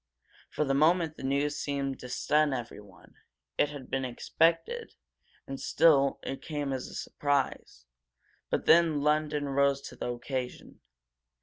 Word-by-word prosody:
For 150 - -1
the 135 - +1
moment 160 +2 +3
the - - -11
news 140 +2 0
seemed 140 -2 -2
to 125 - -9
stun 150 +3 +2
everyone. 105 -6 -10 0.4
It 145 - +4
had 145 -3 -9
been 135 0 -2
expected, 165 - 0 0.5
and 135 0 -6
still 140 -4 +4
it 135 - -5
came 145 -3 -3
as 130 - -4
a - - -10
surprise. 140 - -2 0.6
But - - -1
then 160 -3 +5
London 150 -1 +1
rose 140 0 +2
to - - -12
the - - -4
occasion. 125 +1 -5
140 Hz, 140 wpm, -29 LUFS, 135-150 Hz, 0.6 s, then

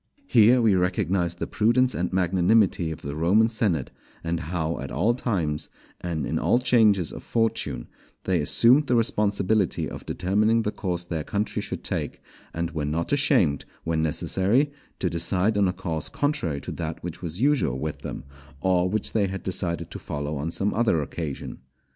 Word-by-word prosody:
Here 120 - +5
we 110 -3 +4
recognize 90 -1 0
the - - -4
prudence 120 +4 +2
and 90 +1 -2
magnanimity 95 0 +2
of 80 - -7
the 70 +1 -5
Roman 95 +8 +3
senate, 100 - -1 0.3
and 85 0 -1
how 85 -1 -3
at - - -5
all 110 +7 +1
times, 90 -12 -2 0.3
and 80 -5 -2
in - - -1
all - - +3
changes 110 -8 +3
of - - -8
fortune, 115 - -1 0.4
they 90 -4 +1
assumed 125 - +4
the 125 - +2
responsibility 105 -3 +1
of - - -8
determining 110 +5 +1
the 105 - -1
course 90 -4 -3
their 85 -3 -4
country 105 +6 -2
should - - -5
take; - - -3 0.3
and 85 0 -3
were 75 -1 -3
not 80 - -1
ashamed, 125 - +3 0.2
when 80 -1 0
necessary, 100 - +2 0.3
to 95 - -1
decide 90 +5 +1
on 100 -1 +3
a - - +1
course 85 -5 -4
contrary 90 - -1
to - - -6
that 80 -2 -5
which 90 -1 -6
was 85 +1 -4
usual 130 - +2
with 75 +2 -4
them, - - -6 0.4
or 90 +2 +2
which 110 +1 -1
they 105 -3 +2
had 95 0 -6
decided 90 -3 -2
to - - -7
follow 75 +1 -4
on 75 +3 -3
some 100 +4 0
other 110 -7 +2
occasion. 75 -1 -5
90 Hz, 175 wpm, -25 LUFS, 80-110 Hz, 0.4 s, Here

